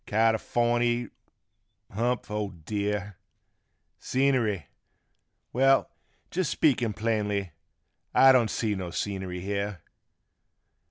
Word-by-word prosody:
Californy! 120 +2 +1 0.8
Humph! 120 +2 -1
O 105 -1 -2
dear! 100 +3 -4 0.8
Scenery! 125 - +1 0.9
Well, 135 +2 +3 0.4
jest 180 -3 0
speaking 120 -7 +2
plainly, 105 -4 -1 0.6
I 135 - +7
don't 120 -4 +4
see 110 -3 -1
no 95 -3 -4
scenery 95 0 -4
here. 100 -1 -3
105 Hz, 85 wpm, -27 LUFS, 100-120 Hz, 0.9 s, I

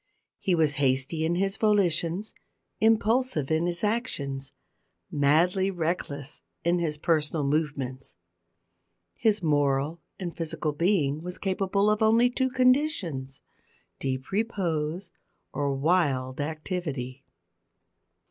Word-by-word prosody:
He 185 - +1
was 155 -3 +2
hasty 135 +4 +1
in 165 +2 +1
his 195 +2 0
volitions, 195 -2 +1 0.5
impulsive 220 - +2
in 160 +2 +2
his 175 +1 -2
actions, 140 - -1 0.6
madly 170 +7 +3
reckless 160 -5 -3 0.2
in 175 +1 +2
his 155 -3 -1
personal 155 -1 +1
movements. 140 - -2 1.0
His 210 - +1
moral 145 +1 +1 0.2
and 175 -3 -5
physical 155 -2 -2
being 155 -3 +1
was 180 +1 -6
capable 200 +1 +1
of 210 - 0
only 230 +3 +4
two 260 +1 +1
conditions 250 - +1 0.6
deep 130 +2 -3
repose 180 -5 -1 0.4
or 140 -1 0
wild 140 -4 +1
activity. 150 -5 -4
165 Hz, 105 wpm, -27 LUFS, 145-195 Hz, 1.0 s, only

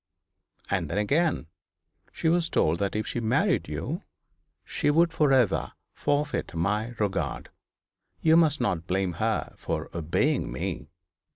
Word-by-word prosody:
And - - 0
then, 90 - -2
again, 145 - +1 0.7
she - - -2
was 170 0 +2
told 80 +2 +2
that 100 0 -1
if 110 - -1
she - - -3
married 110 -1 +1
you, - - -4 0.6
she 145 - 0
would 165 +3 +4
for 150 -3 +3
ever 125 -6 +2 0.2
forfeit 145 - -1
my 105 +7 -1
regard. 105 -2 -2 0.7
You 160 0 +4
must 160 -3 +4
not 85 -9 -1
blame 95 -1 0
her 110 0 0
for - - -4
obeying 80 -6 0
me.' 70 +3 -4
110 Hz, 135 wpm, -27 LUFS, 95-150 Hz, 0.7 s, would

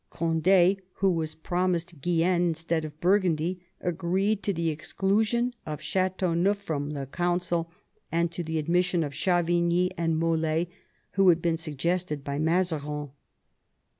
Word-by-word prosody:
Cond^, 175 +4 +3
who 195 -1 +2
was 160 -2 -2
promised 175 -1 -1
Guienne 175 +2 +2
instead 165 -1 0
of 150 0 -9
Burgundy, 180 -2 +2 0.2
agreed 190 +4 0
to 200 - 0
the 170 -3 -1
exclusion 210 +10 0
of 150 -2 -5
Ch^teauneuf 185 0 +1
from 150 -7 -4
the 140 -2 -4
Council, 175 +2 -1 0.4
and 170 0 +1
to 175 +1 -4
the 160 0 -3
admission 175 +2 +1
of 145 - -4
Chavigny 175 +2 +2
and 165 -1 +1
Mol^, 165 0 +1 0.4
who 195 -1 +4
had 170 -1 +5
been 165 -1 0
suggested 160 0 -2
by 140 0 -3
Mazarin. 155 -4 0
170 Hz, 135 wpm, -27 LUFS, 160-180 Hz, 0.4 s, had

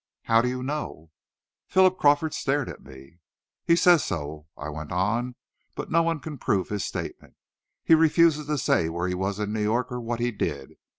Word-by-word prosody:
"How 115 0 +4
do 125 - 0
you 125 0 -4
know?" 130 - -5 0.6
Philip 185 0 +3
Crawford 145 +2 +3
stared 140 -1 -1
at - - -10
me. 70 +6 -15 0.5
"He 170 - +5
says 175 -2 +5
so," 75 -1 -5
I 70 - -6
went 75 0 -7
on; 115 +8 -1 0.4
"but - - -6
no 165 +1 +4
one 165 -1 0
can 150 -2 -8
prove 95 -5 0
his 105 -2 -2
statement. - - -6 0.5
He - - +4
refuses 160 -1 +4
to 150 0 0
say 85 -10 +1
where 85 +2 -2
he 90 - -1
was 95 +2 -2
in 105 0 -2
New 110 - -1
York, 115 +5 0
or 125 0 -4
what 120 0 -3
he 120 +1 0
did. 70 - -4
120 Hz, 195 wpm, -25 LUFS, 90-150 Hz, 0.6 s, He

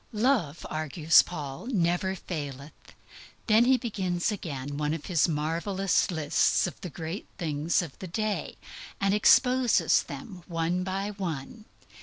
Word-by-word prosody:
_ - - -35
"Love," 215 - 0
urges 155 +1 +4
Paul, 145 - -7
"never 190 -4 0
faileth." 145 -5 -6 0.7
Then 220 +1 +5
he 260 +1 +5
begins 190 -7 -1
again 145 -8 -5
one 150 +1 0
of 165 - -8
his 170 -6 +2
marvelous 170 +5 0
lists 160 -3 +2
of 180 - -6
the 180 - -5
great 165 +5 -6
things 160 +1 0
of 150 -6 -10
the 190 - -6
day, 215 +4 -3 0.4
and 195 0 +2
exposes 245 -3 +4
them 175 +7 -9
one 170 +1 -1
by 195 +2 -3
one. 185 +1 -6
175 Hz, 140 wpm, -28 LUFS, 155-200 Hz, 0.7 s, Then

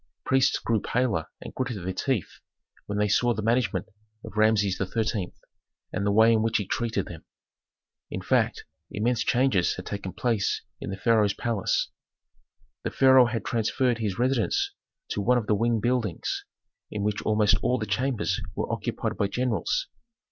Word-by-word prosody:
Priests 135 +1 +3
grew 115 -3 0
pale 115 -10 0 0.2
and - - -8
gritted 120 -8 -3
their 95 - -2
teeth 120 - -2 0.5
when 105 - -3
they 105 0 +2
saw 120 +3 +2
the 110 - -3
management 115 -5 +1 0.4
of - - -10
Rameses 110 -3 +3
XIII. 100 0 -1 0.6
and 100 - -1
the - - +3
way 110 +2 +6
in 110 - +3
which 110 0 +2
he 105 - -2
treated 110 -1 -1
them. 85 -3 -10 0.9
In - - -4
fact, - - +1 0.2
immense 115 +2 0
changes 120 -8 +2
had 95 - -8
taken 100 -2 -5
place 115 -3 0 0.2
in - - -6
the 95 - -4
pharaoh's 105 0 +3
palace. 115 -5 0 0.9
The - - -2
pharaoh 130 -2 +6
had 115 -1 -3
transferred 120 +1 +1
his 105 -4 -2
residence 125 -1 +1 0.4
to 105 - -2
one 125 +5 +3
of 115 - -1
the 105 - +2
wing 115 +2 +2
buildings, 115 -5 -1 0.4
in 105 - -3
which 105 0 -1
almost 105 -1 +3
all 125 - +1
the 110 - -3
chambers 125 -2 -1
were - - -2
occupied - - -3
by 100 - +1
generals. 125 - -1
110 Hz, 165 wpm, -26 LUFS, 100-120 Hz, 0.9 s, way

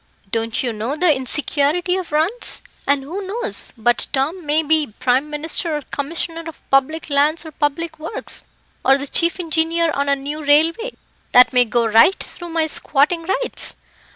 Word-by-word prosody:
"Don't 225 +1 -1
you 240 -2 -1
know 225 +6 -3
the 315 -2 +3
insecurity 295 +6 0
of 370 -4 -4
runs? 330 +11 0 0.2
And 280 -1 +2
who 345 +9 -5
knows 470 +5 -3
but 240 +2 +1
Tom 295 +7 -1
may 305 +2 +2
be 310 -1 +2
Prime 260 +4 +1
Minister 305 +1 -2
or 295 - -7
Commissioner 330 +4 -3
of 325 - -11
Public 290 +4 +1
Lands 295 +4 +2
or 315 - -8
Public 315 +2 -2
Works, 320 +7 -3 0.4
or 270 +2 +5
the 280 - -5
chief 335 +5 +2
engineer 330 0 +1
on 280 0 -1
a 280 - +4
new 290 +3 -6
railway, 330 +11 +2 0.4
that 250 +1 +7
may 250 -1 +5
go 235 +1 +1
right 225 - +5
through 345 -1 -9
my 325 -1 +1
squatting 315 +2 +1 0.2
rights? - - -2
300 Hz, 170 wpm, -20 LUFS, 275-330 Hz, 0.4 s, that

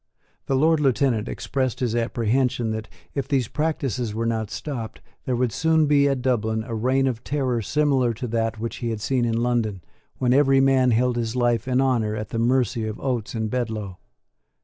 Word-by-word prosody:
The 135 - +1
Lord 160 +3 +3
Lieutenant 130 -5 +1
expressed 130 -3 -2
his 120 -3 0
apprehension 120 +1 0
that, 110 0 -5 0.2
if 140 - -2
these 130 -5 +1
practices 130 -8 -2
were 115 +1 -1
not 110 -2 -1
stopped, 120 -7 -5 0.3
there 125 - 0
would 120 -1 0
soon 160 +4 +2
be 140 -1 +4
at 135 -3 -1
Dublin 110 -3 0
a 115 - -6
reign 130 +4 +1
of 125 -3 -2
terror 130 -5 -1
similar 135 -1 +2
to 120 - -5
that 115 -1 -1
which 115 +1 -4
he 120 - -3
had 110 -2 -3
seen 125 +2 0
in 115 -1 0
London, 110 -7 -1 0.3
when 125 -1 +2
every 135 -1 +4
man 135 -1 +4
held 120 +1 +2
his 115 0 -2
life 120 -1 +1
and 130 0 +2
honour 115 -5 +1
at 105 -1 -5
the 115 - -3
mercy 120 -2 +1
of 110 - -5
Oates 120 -5 -2
and 110 -1 -1
Bedloe. 110 -7 -3
120 Hz, 195 wpm, -24 LUFS, 115-135 Hz, 0.3 s, be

